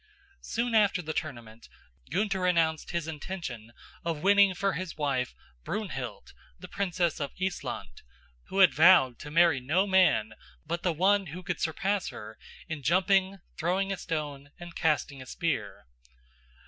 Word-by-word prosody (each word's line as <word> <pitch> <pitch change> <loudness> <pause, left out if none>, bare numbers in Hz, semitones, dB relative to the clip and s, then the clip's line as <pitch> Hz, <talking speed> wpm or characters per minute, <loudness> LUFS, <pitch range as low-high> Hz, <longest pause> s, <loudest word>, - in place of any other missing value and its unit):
Soon 235 0 -2
after 205 -3 +4
the 160 0 -4
tournament 120 -8 -6 0.4
Gunther 195 -2 0
announced 160 -3 +1
his 170 -2 -2
intention 150 - -6 0.3
of 165 -3 -3
winning 200 -1 +5
for 195 +2 0
his 180 -1 -5
wife, 135 -4 -1 0.3
Brunhild, - - -5 0.2
the - - -10
princess 175 -4 -1
of 140 -2 -4
Issland, 180 - -4 0.5
who - - -6
had 185 - +7
vowed 155 -7 +6
to 150 - -8
marry 165 -2 +4
no 155 +10 +1
man 185 - +3 0.3
but 170 +2 -3
the 180 - +1
one 195 +4 +2
who 175 +5 -8
could - - -4
surpass 190 +4 -1
her 110 0 -9 0.3
in 160 -3 -5
jumping, 190 +5 +2 0.2
throwing 190 +4 0
a - - -5
stone 145 -4 -4
and 175 -1 -10
casting 150 -4 0
a 130 - -11
spear. 135 - -3
170 Hz, 150 wpm, -29 LUFS, 145-190 Hz, 0.5 s, had